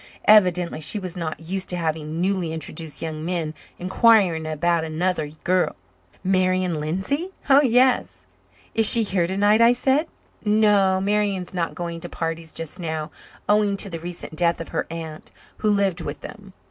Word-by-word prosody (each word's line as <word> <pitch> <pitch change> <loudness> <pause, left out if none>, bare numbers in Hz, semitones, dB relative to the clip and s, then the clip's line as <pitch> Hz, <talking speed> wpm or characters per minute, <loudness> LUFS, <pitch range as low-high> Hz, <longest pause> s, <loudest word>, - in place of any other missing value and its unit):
Evidently 180 -6 +4
she 155 +7 -2
was 185 -3 -6
not 165 -3 -4
used 185 +3 -4
to 180 - -1
having 160 -1 -3
newly 185 -2 0
introduced 160 -1 -7
young 155 -1 -5
men 165 -3 -2 0.2
inquiring 185 -4 +3
about 165 +2 0
another 160 0 -1 0.2
girl. 185 0 +1 0.5
"Marian 185 -3 +1
Lindsay? 190 - -2 0.2
Oh, 275 +1 +8
yes." 255 -1 +2 0.5
"Is 225 -2 +8
she 230 - +7
here 185 -4 0
tonight?" 205 +4 +3
I 235 +1 +6
said. 270 +5 +1 0.4
"No, 210 -3 +3
Marian 200 -1 0
is 180 - -15
not 170 -2 -2
going 170 -1 -5
to - - -8
parties 165 -1 -5
just 165 +1 -8
now, 160 -2 -4 0.4
owing 205 -1 +2
to 195 - -1
the 165 - -5
recent 170 -1 -8
death 170 0 +1
of 165 - -7
her - - -3
aunt, 160 -2 -8 0.3
who 215 - 0
lived 200 -3 +1
with 145 -2 -6
them." 205 -4 -11
180 Hz, 165 wpm, -23 LUFS, 165-205 Hz, 0.5 s, Oh